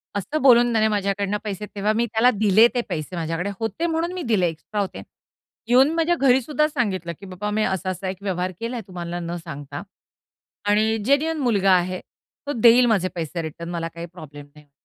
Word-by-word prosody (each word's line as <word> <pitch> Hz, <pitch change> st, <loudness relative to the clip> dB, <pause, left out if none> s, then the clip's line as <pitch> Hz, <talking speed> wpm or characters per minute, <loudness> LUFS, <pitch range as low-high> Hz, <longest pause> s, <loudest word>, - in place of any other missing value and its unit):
असं 205 Hz, +11 st, -2 dB
बोलून 240 Hz, -2 st, +6 dB
त्याने 220 Hz, -1 st, +3 dB
माझ्याकडनं 200 Hz, 0 st, -1 dB
पैसे 210 Hz, -1 st, -4 dB
तेव्हा 205 Hz, +1 st, +1 dB
मी 230 Hz, +2 st, +1 dB
त्याला 230 Hz, +2 st, +3 dB
दिले 215 Hz, +2 st, +5 dB
ते 245 Hz, -, +2 dB
पैसे. 155 Hz, +3 st, -4 dB
माझ्याकडे 165 Hz, +3 st, -2 dB
होते 225 Hz, +8 st, -2 dB
म्हणून 330 Hz, +1 st, -1 dB
मी 365 Hz, -, -4 dB
दिले. 185 Hz, -5 st, +3 dB
एक्स्ट्रा 185 Hz, +6 st, -4 dB
होते. 195 Hz, -, -5 dB, 0.7 s
येऊन 255 Hz, +4 st, +5 dB
माझ्या 335 Hz, +1 st, +2 dB
घरी 265 Hz, -4 st, +4 dB
सुद्धा 300 Hz, +4 st, +1 dB
सांगितलं, 195 Hz, -, -2 dB
की 200 Hz, -, -11 dB
"बाबा, 190 Hz, +2 st, -5 dB
मी 215 Hz, +1 st, +1 dB
असा-असा 190 Hz, -1 st, -2 dB
एक 190 Hz, -, -5 dB
व्यवहार 185 Hz, -2 st, -2 dB
केलाय 235 Hz, +1 st, -4 dB
तुम्हाला 175 Hz, -1 st, -5 dB
न 170 Hz, 0 st, -4 dB
सांगता. 145 Hz, -3 st, -7 dB, 0.9 s
आणि 215 Hz, +2 st, +3 dB
जेन्युइन 300 Hz, +5 st, +2 dB
मुलगा 205 Hz, -8 st, +2 dB
आहे. 180 Hz, 0 st, +1 dB, 0.5 s
तो 290 Hz, -, -1 dB
देईल 240 Hz, +2 st, +7 dB
माझे 205 Hz, -6 st, +2 dB
पैसे 170 Hz, 0 st, -3 dB
रिटर्न. 165 Hz, +1 st, -7 dB
मला 170 Hz, -1 st, -3 dB
काही 170 Hz, 0 st, -6 dB
प्रॉब्लेम 155 Hz, -4 st, -11 dB
नाही." 150 Hz, -1 st, -18 dB
200 Hz, 185 wpm, -23 LUFS, 175-240 Hz, 0.9 s, देईल